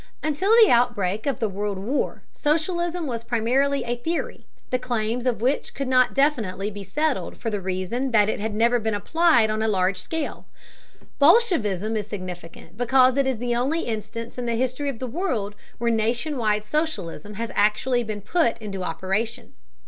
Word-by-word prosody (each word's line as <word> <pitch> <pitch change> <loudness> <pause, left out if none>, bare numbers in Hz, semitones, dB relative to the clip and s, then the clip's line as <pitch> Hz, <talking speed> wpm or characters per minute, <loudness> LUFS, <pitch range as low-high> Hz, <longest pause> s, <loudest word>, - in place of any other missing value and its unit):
Until 310 +6 0
the 435 - +5
outbreak 225 -3 +1
of 275 - 0
the 225 - 0
World 200 0 -3
War 230 +10 -2
socialism 345 +3 0
was 235 -4 -4
primarily 255 +5 +1
a 240 0 -2
theory, 325 +8 -4 0.2
the 255 - +1
claims 240 0 -2
of 235 -3 0
which 265 +3 0
could 275 - -3
not 255 -1 +3
definitely 220 -9 +1
be 200 0 -7
settled 300 +10 -1
for 225 - -3
the 205 -2 -2
reason 190 +8 -2
that 210 -4 +4
it 215 - -1
had 210 0 -3
never 235 +2 +3
been 220 -1 -1
applied 275 -1 +3
on 215 0 -1
a 220 - +1
large 190 -2 +1
scale. 315 - -4 0.7
Bolshevism 275 - +3
is 210 -2 -2
significant 180 -3 -8
because 255 +1 +4
it 275 -1 +2
is 260 -3 0
the 240 +1 -1
only 275 +8 0
instance 230 +1 -5
in 245 - -3
the 235 - 0
history 255 +4 -1
of 270 - -5
the 255 - -4
world 240 - -2 0.2
where 235 0 +1
nation 235 +7 0
wide 215 -4 +1
socialism 210 - -3
has 230 +2 -4
actually 215 +5 +2
been 215 -2 -5
put 235 - +1
into 200 -4 -6
operation. 210 +7 -3
235 Hz, 180 wpm, -24 LUFS, 210-270 Hz, 0.7 s, the